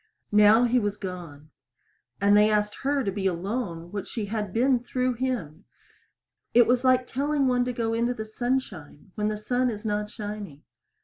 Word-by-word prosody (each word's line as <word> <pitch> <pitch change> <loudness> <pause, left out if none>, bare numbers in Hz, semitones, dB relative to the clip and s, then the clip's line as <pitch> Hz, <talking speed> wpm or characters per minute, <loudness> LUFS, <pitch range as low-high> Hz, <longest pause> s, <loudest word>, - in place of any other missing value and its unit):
Now 210 +3 +6
he 245 +1 +3
was 205 -2 -2
gone; 170 -6 -8 0.7
and 200 +1 +4
they 210 +1 +5
asked 210 0 0
her 280 0 0
to 200 - -1
be 195 0 -1
alone 175 -2 -3
what 205 -2 -5
she 220 -3 -4
had 210 -1 -3
been 250 +4 +2
through 250 +1 -1
him. 230 - -4 0.9
It 240 -1 +7
was 245 +1 +2
like 255 -1 +4
telling 280 +2 0
one 250 -1 +2
to 250 - -1
go 230 -2 -2
into 235 +2 0
the 220 - -5
sunshine 215 - -4
when 210 0 -1
the 215 0 -2
sun 245 +4 0
is 215 -1 -6
not 210 0 -1
shining. 205 -9 -7
215 Hz, 180 wpm, -26 LUFS, 200-245 Hz, 0.9 s, It